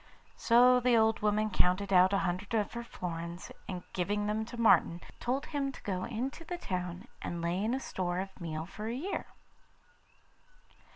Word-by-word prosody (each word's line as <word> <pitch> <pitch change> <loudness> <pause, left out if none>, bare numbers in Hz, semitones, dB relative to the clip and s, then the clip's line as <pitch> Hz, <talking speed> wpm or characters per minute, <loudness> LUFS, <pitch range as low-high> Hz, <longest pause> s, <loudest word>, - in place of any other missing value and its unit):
So 250 +2 +6
the 245 -1 +4
old 220 0 +3
woman 210 0 +1
counted 195 +2 +2
out 185 +1 +7
a 200 - +3
hundred 185 +5 -2
of 210 -2 0
her 235 0 -4
florins, 170 -4 -6 0.2
and 180 -2 -4
giving 205 +3 0
them 215 +1 -1
to 235 +1 -8
Martin, 195 -6 +5 0.2
told 265 +4 -1
him 280 -2 -2
to - - -11
go 185 -2 -2
into 255 +7 -4
the 350 +2 -5
town 180 - -4
and 170 - -4
lay 170 +3 -1
in 230 +4 +1
a - - -2
store 180 -8 -2
of 190 0 -5
meal 160 -1 -3
for 210 +4 -7
a 230 - -2
year. 355 +10 -3
205 Hz, 180 wpm, -32 LUFS, 180-235 Hz, 0.2 s, out